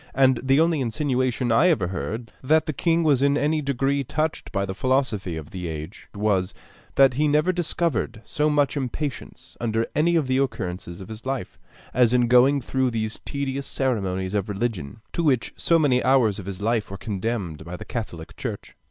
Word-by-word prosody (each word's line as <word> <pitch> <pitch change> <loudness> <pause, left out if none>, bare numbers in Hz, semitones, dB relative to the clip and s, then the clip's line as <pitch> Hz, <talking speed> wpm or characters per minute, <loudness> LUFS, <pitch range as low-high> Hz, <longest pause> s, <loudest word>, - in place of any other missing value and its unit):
And 130 -2 +4
the 135 +2 +3
only 165 -2 +3
insinuation 130 -1 0
I 145 +10 +5
ever 100 - +1
heard, 110 +4 -4
that 155 +4 +3
the 155 - -2
king 165 +3 +2
was 145 -5 +3
in 140 +1 +3
any 150 +2 +1
degree 140 0 0
touched 155 +4 -2
by 100 0 0
the 95 - -4
philosophy 120 -8 0
of 80 0 -8
the 90 -2 -5
age, 80 +4 -7
was, 100 -3 0 0.4
that 135 -1 +6
he 150 +4 +2
never 150 +5 +3
discovered 170 -9 -1
so 150 0 +1
much 145 -1 +2
impatience, 140 +1 -5
under 115 -1 0
any 170 +3 +2
of 160 -4 +2
the 130 0 +1
occurrences 90 -9 -3
of 95 - -9
his 110 0 -8
life, 135 -7 -4 0.3
as 125 -1 +4
in 120 -1 +3
going 130 +3 +5
through 130 +1 0
those 110 -2 -3
tedious 140 -1 -3
ceremonies 95 -8 -1
of 100 -1 -1
religion, 100 -5 -3
to - - 0
which 135 -7 +1
so 170 - +3
many 135 -6 +3
hours 120 -6 +3
of 95 - -8
his 100 0 -5
life 115 -1 0
were 100 - -6
condemned 95 -6 -3
by 85 +2 -7
the - - -9
catholic 90 -9 -6
church. - - -6
125 Hz, 190 wpm, -24 LUFS, 100-140 Hz, 0.4 s, that